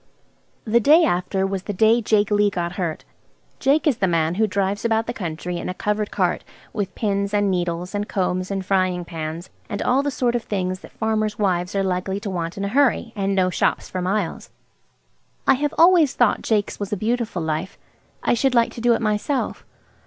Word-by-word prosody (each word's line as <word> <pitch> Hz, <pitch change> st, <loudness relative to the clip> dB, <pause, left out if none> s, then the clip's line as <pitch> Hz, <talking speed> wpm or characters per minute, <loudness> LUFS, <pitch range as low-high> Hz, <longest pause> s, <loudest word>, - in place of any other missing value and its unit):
The 230 Hz, +1 st, +3 dB
day 305 Hz, +9 st, +6 dB
after 190 Hz, -, 0 dB
was 195 Hz, -1 st, -2 dB
the 205 Hz, +2 st, -5 dB
day 220 Hz, +4 st, +4 dB
Jake 210 Hz, -2 st, +2 dB
Lee 205 Hz, 0 st, +4 dB
got 175 Hz, -3 st, -3 dB
hurt. 175 Hz, -3 st, -4 dB, 0.5 s
Jake 280 Hz, +2 st, +2 dB
is 285 Hz, -7 st, +2 dB
the 190 Hz, -, +1 dB
man 165 Hz, -1 st, +1 dB
who 215 Hz, +4 st, +2 dB
drives 200 Hz, +1 st, -1 dB
about 225 Hz, -1 st, +1 dB
the 240 Hz, -, -3 dB
country 175 Hz, -3 st, -4 dB
in -, -, -4 dB
a 185 Hz, -, -4 dB
covered 210 Hz, +1 st, -1 dB
cart, 180 Hz, -3 st, 0 dB, 0.3 s
with 200 Hz, -3 st, -3 dB
pins 200 Hz, -1 st, -1 dB
and 205 Hz, -1 st, +2 dB
needles, 175 Hz, 0 st, -2 dB
and 205 Hz, 0 st, -3 dB
combs 185 Hz, -1 st, -1 dB
and 195 Hz, -1 st, -3 dB
frying 185 Hz, -2 st, +1 dB
pans, 165 Hz, 0 st, -6 dB, 0.2 s
and 205 Hz, -, -3 dB
all 255 Hz, +2 st, +3 dB
the 285 Hz, -, -1 dB
sort 250 Hz, -3 st, 0 dB
of 240 Hz, -, 0 dB
things 185 Hz, -3 st, -2 dB
that -, -, -13 dB
farmers' 215 Hz, -1 st, -1 dB
wives 185 Hz, -2 st, 0 dB
are 195 Hz, -, +1 dB
likely 190 Hz, +1 st, -1 dB
to 200 Hz, -, -4 dB
want 170 Hz, -1 st, -4 dB
in 200 Hz, -, -2 dB
a -, -, -2 dB
hurry, 250 Hz, -2 st, +2 dB
and 195 Hz, -1 st, 0 dB
no 185 Hz, -1 st, +2 dB
shops -, -, 0 dB
for 185 Hz, -, -3 dB
miles. 185 Hz, -1 st, -2 dB, 1.0 s
I -, -, +6 dB
have 290 Hz, +2 st, -1 dB
always 335 Hz, -4 st, +5 dB
thought 240 Hz, -4 st, +2 dB
Jake's 210 Hz, -3 st, -1 dB
was 200 Hz, -1 st, -4 dB
a 210 Hz, -, -1 dB
beautiful 220 Hz, -4 st, -1 dB
life. 160 Hz, +4 st, -3 dB, 0.5 s
I -, -, +2 dB
should 250 Hz, +2 st, +1 dB
like 235 Hz, -1 st, +3 dB
to 235 Hz, -, -7 dB
do 240 Hz, 0 st, +4 dB
it 225 Hz, -, -3 dB
myself. 215 Hz, +6 st, -1 dB
200 Hz, 205 wpm, -22 LUFS, 185-225 Hz, 1.0 s, day